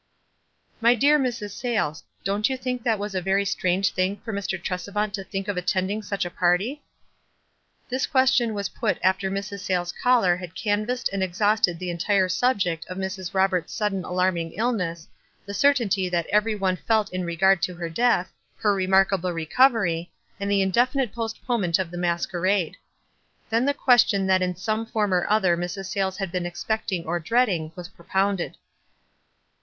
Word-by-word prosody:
'" - - -40
"My 235 +2 +5
dear 290 +5 +4
Mrs. 240 -6 -2
Sayles, 215 - -2 0.2
don't 205 +4 +1
you 265 - -2
think 250 -2 -3
it 225 -2 +3
was 205 0 -5
a 185 - -1
very 195 +2 +1
strange 185 -1 +1
thing 185 +2 0
for 225 - -4
Mr. 195 -1 -2
Tresevant 200 +4 -3
to 195 -2 -4
think 195 +1 -5
of 205 -2 -2
attending 185 +3 -1
such 200 -2 -3
a 175 - -5
party? 190 +13 +1 0.6
" - - -43
This 255 +1 -1
question 260 -4 +3
was 200 -1 -2
put - - -1
after 190 +1 +2
Mrs. 200 +1 -4
Sayles' 180 -2 -1
caller 230 -8 +3
had 180 -2 -9
canvassed 215 +4 -1
and 195 - -1
exhausted 190 0 +2
the 180 0 -4
entire 190 +2 +1
subject 180 -6 +1
of 185 - -7
Mrs. 190 -1 -4
Roberts' 190 -2 +1
sudden 205 -4 -1
alarming 180 -2 -1
illness, 180 -9 -2 0.4
the 200 - -6
certainty 205 -6 +2
that 170 -2 0
every 210 +2 +2
one 190 -2 0
felt 215 0 0
in 185 0 -2
regard 175 +2 +3
to 180 - -1
her 170 -1 -4
death, 185 +1 +1 0.2
her 210 -2 +2
remarkable 190 -1 +2
recovery, 175 - +2 0.3
and 200 0 -2
the 200 -1 +3
indefinite 245 +5 +1
postponement 225 -5 -1
of 185 -3 -3
the 175 - -6
masquerade. 175 +1 0 0.8
Then 230 +3 +2
the 285 0 +1
question 240 -7 +4
that 190 -1 +3
in 180 -1 0
some 215 +5 -2
form 210 -4 0
or 180 -1 +1
other 195 -5 +3
Mrs. 180 +3 -4
Sayles 190 -1 -1
had 195 -4 -3
been 180 -1 -2
expecting 185 -1 -3
or 175 +2 -1
dreading, 180 -4 +1
was 180 -1 -7
propounded. 190 +1 -2
195 Hz, 170 wpm, -24 LUFS, 180-215 Hz, 0.8 s, My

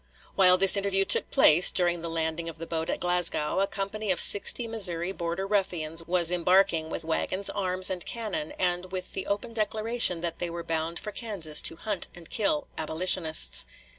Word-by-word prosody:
While 185 -2 +4
this 195 +1 +5
interview 195 -1 0
took - - +2
place, 165 +4 +6
during 175 -2 -1
the 170 - -6
landing 165 0 -3
of 165 - -10
the 165 - -8
boat 165 -1 -5
at - - -3
Glasgow, 175 -2 0
a 195 - 0
company 200 +1 -4
of 180 - 0
sixty 230 +3 +5
Missouri 185 -6 0
Border 170 +1 -5
Ruffians 175 -5 -2
was 175 -1 +2
embarking, 180 -2 +1
with - - -5
wagons, 185 +4 -1
arms, 185 -2 +1
and 180 -2 -5
cannon, 215 -10 -5
and 180 0 -3
with 185 -1 -6
the 190 - -6
open 205 +3 -4
declaration 215 -4 0
that 170 -1 -4
they 175 - -4
were 170 0 -7
bound 165 0 -4
for 210 - -7
Kansas 195 -10 -1
to - - -1
hunt 205 +1 -1
and 170 -2 -14
kill 200 -8 -1
"abolitionists." 160 0 +2
180 Hz, 185 wpm, -26 LUFS, 165-195 Hz, -, place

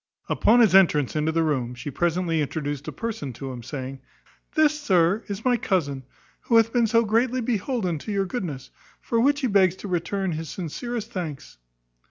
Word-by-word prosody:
Upon 240 +3 +4
his 215 -6 +5
entrance 160 -9 +4
into 155 +1 +1
the 165 0 +1
room, 130 -6 -1
she 145 +4 -6
presently 170 +1 0
introduced 145 -1 -3
a - - -3
person 220 - -5
to 135 +2 -6
him, 125 -2 -7
saying, 130 +2 -6 0.6
"This, 305 -1 +3
sir, 190 - +3
is 200 +3 -6
my 250 -1 +3
cousin, 145 - -1 0.4
who 230 - +3
hath 225 0 +3
been 240 -2 +3
so 230 +1 +3
greatly 235 +4 +1
beholden 225 - -1
to 215 - -6
your 200 -1 0
goodness, 175 - -5 0.3
for 230 - -1
which 285 +4 +3
he 260 - +1
begs 190 -4 +3
to 200 - -8
return 185 +1 -1
you 155 - -3
his 160 0 -6
sincerest 220 +7 -5
thanks." 155 - -6
185 Hz, 190 wpm, -24 LUFS, 150-230 Hz, 0.6 s, his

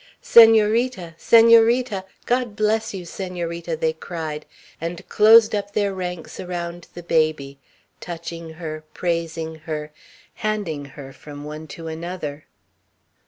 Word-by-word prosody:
"Senorita! 225 -4 +5
Senorita! 230 -2 +5 0.2
God 245 -3 0
bless 220 +1 0
you, 185 -3 -7
Senorita!" 170 -2 -5
they 160 0 0
cried; 160 -2 -6 0.3
and 170 +1 -5
closed 220 +1 +6
up 205 -1 -3
their 205 -1 0
ranks 180 -3 -6
around 175 -1 -5
the 175 - -8
baby, 155 -4 0 0.4
touching 170 -1 -7
her, 155 -1 -7
praising 165 -2 -2 0.2
her, 150 -1 -4 0.5
handing 205 -9 -2
her 135 -1 -11
from 145 0 -11
one 155 +1 -8
to 165 +2 -9
another. 160 -2 -6
170 Hz, 115 wpm, -22 LUFS, 160-210 Hz, 0.5 s, closed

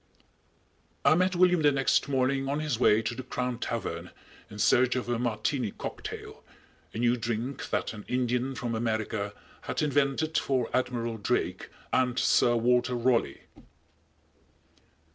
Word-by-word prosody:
_ - - -39 1.0
I - - +7
met 185 +2 +2
William 180 -1 +4
the 145 -1 +5
next 135 0 +1
morning 135 0 +1
on 145 +2 0
his 150 -7 -2
way 110 -2 +4
to 110 - -2
the 125 - -6
Crown 125 -1 -3
Tavern 90 -8 -4 0.4
in - - -10
search 125 0 +3
of 125 - -2
a 120 -1 -1
"Martini 120 +1 -1
Cocktail," - - -7 0.5
a - - -8
new 120 +1 +3
drink 120 +3 -3
that - - -1
an 105 -2 -9
Indian 125 +1 0
from 120 -1 -3
America 110 -2 -2 0.3
had - - -2
invented 145 +2 +1
for 130 -3 -1
Admiral 120 -3 -1
Drake 105 - -1 0.2
and 125 -1 +2
Sir 120 -1 +4
Walter 125 +1 +2
Raleigh. 120 0 +1
125 Hz, 145 wpm, -28 LUFS, 115-135 Hz, 1.0 s, I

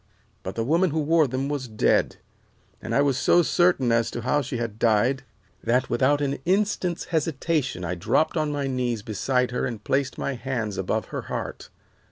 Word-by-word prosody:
But 95 - -6
the 115 - -1
woman 170 +8 +2
who 160 +1 -1
wore 155 0 +3
them 130 +2 -2
was 140 -3 -3
dead, 110 -2 +1 0.7
and - - -3
I 140 - +4
was 140 -2 +1
so 175 +3 +4
certain 175 -9 +2
as 115 0 +2
to 120 - -5
how 130 +5 +1
she 125 -2 -4
had 115 -2 -4
died 120 +4 +2 0.4
that 125 +3 +1
without 145 +2 +2
an 140 -1 -1
instant's 185 -2 0
hesitation 150 - -1
I 85 - -2
dropped 90 - +1
on 155 -2 0
my 145 -1 -2
knees 125 -5 -1
beside 125 +4 0
her 125 - -1
and 115 -4 -6
placed 135 0 0
my 140 - -2
hands 120 -5 -3
above 95 - -2
her - - -2
heart. - - -5
130 Hz, 190 wpm, -25 LUFS, 115-150 Hz, 0.7 s, I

